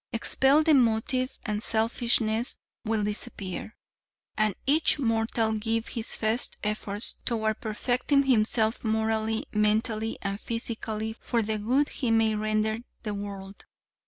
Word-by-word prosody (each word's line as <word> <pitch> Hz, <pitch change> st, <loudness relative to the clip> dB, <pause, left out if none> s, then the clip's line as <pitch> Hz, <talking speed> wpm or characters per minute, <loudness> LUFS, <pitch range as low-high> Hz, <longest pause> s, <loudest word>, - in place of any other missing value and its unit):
Expel 270 Hz, +6 st, +3 dB
the 315 Hz, 0 st, +4 dB
motive 255 Hz, +1 st, +2 dB
and 210 Hz, -2 st, -2 dB
selfishness 225 Hz, 0 st, +1 dB, 0.3 s
will 220 Hz, -2 st, 0 dB
disappear, 210 Hz, -1 st, -3 dB, 0.6 s
and 215 Hz, -3 st, +1 dB
each 295 Hz, +4 st, +4 dB
mortal 225 Hz, -3 st, +1 dB
give 225 Hz, +1 st, -1 dB
his 230 Hz, -2 st, -2 dB
best 220 Hz, +2 st, 0 dB
efforts 210 Hz, 0 st, -1 dB
toward 220 Hz, -3 st, -1 dB
perfecting 250 Hz, +5 st, +1 dB
himself 225 Hz, -3 st, +2 dB
morally, 220 Hz, 0 st, 0 dB
mentally 215 Hz, +1 st, +1 dB
and 200 Hz, 0 st, -2 dB
physically 220 Hz, -1 st, -3 dB
for 230 Hz, 0 st, -1 dB
the 215 Hz, 0 st, -2 dB
good 260 Hz, +8 st, +1 dB
he 250 Hz, -, -2 dB
may 225 Hz, -1 st, +3 dB
render 215 Hz, +1 st, 0 dB, 0.2 s
the 210 Hz, -2 st, -3 dB
world. 200 Hz, -1 st, -7 dB
220 Hz, 125 wpm, -27 LUFS, 215-235 Hz, 0.6 s, the